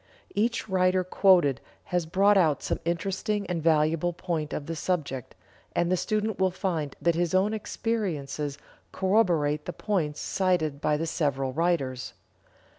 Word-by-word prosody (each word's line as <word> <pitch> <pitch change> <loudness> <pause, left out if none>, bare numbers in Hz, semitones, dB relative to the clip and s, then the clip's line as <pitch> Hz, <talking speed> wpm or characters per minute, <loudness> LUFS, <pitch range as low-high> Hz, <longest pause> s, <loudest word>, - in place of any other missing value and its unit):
Each 230 +3 0
writer 185 -1 +2
quoted 180 -7 +4 0.2
has 175 -2 -1
brought 200 +5 +4
out 160 -7 +3
some - - -1
interesting 195 +4 -1
and 180 -3 -2
valuable 160 +2 +2
point 165 -3 -3
of 145 - -4
the 165 - -4
subject, 150 -7 -3 0.4
and 175 +1 +1
the - - +4
student 215 +2 -1
will 190 0 +3
find 175 -6 -3
that 170 - +2
his 175 +1 0
own 200 +3 +3
experiences 160 - -3 0.3
corroborate 175 -7 +2
the 180 - -4
points 165 -8 -1
cited 165 -7 0
by 150 -1 +2
the 165 - -2
several 135 -5 -1
writers. 145 -6 -1
175 Hz, 145 wpm, -27 LUFS, 150-190 Hz, 0.4 s, quoted